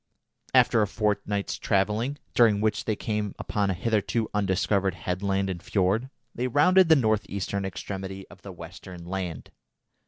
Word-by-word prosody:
After 115 - +5
a 105 - +2
fortnight's 105 -1 -1
travelling, 105 +8 0 0.2
during 110 -4 +5
which 110 +1 0
they 110 - 0
came 105 -1 -3
upon 100 -2 -1
a 95 - 0
hitherto 110 +3 0
undiscovered 100 -1 +1
headland 95 +3 -1
and 90 -3 -4
fjord, 105 +6 0 0.2
they 125 +2 -1
rounded 170 +7 +5
the 160 - +8
north 110 -6 +1
eastern 100 0 -3
extremity 95 0 -6
of - - -15
the 100 - -9
western 90 0 -10
land. 90 -4 -5
100 Hz, 150 wpm, -26 LUFS, 95-110 Hz, 0.2 s, the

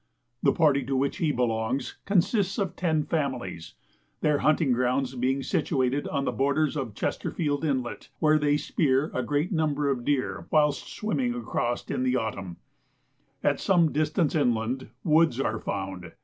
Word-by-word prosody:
The - - +4
party 145 -4 +3
to 135 +1 -1
which 135 +2 0
he 160 -4 +1
belongs 120 0 -1
consists 200 +1 +1
of 195 -3 -2
ten 160 -4 +1
families, 130 - -3 0.5
their 150 -2 +2
hunting 155 -2 +3
grounds 125 +2 +1
being 130 +2 0
situated 130 +1 0
on 140 -2 -1
the - - 0
borders 140 +5 +1
of 130 -8 -4
Chesterfield 145 - -2
Inlet, 130 -7 -2
where 155 +2 +4
they 145 0 +2
spear 145 -1 +1
a 130 - 0
great 145 - -1
number 150 -4 +1
of 125 -3 -2
deer 100 -11 -1
whilst 150 -2 +2
swimming 240 +3 -1
across 120 - -2
in - - -1
the 130 0 +1
autumn. 100 -7 -3 0.9
At - - +2
some 170 -5 +3
distance 155 +1 +1
inland, 125 -3 0
woods 155 -5 +3
are 110 -5 -1
found. 95 -2 -5
140 Hz, 155 wpm, -27 LUFS, 125-155 Hz, 0.9 s, The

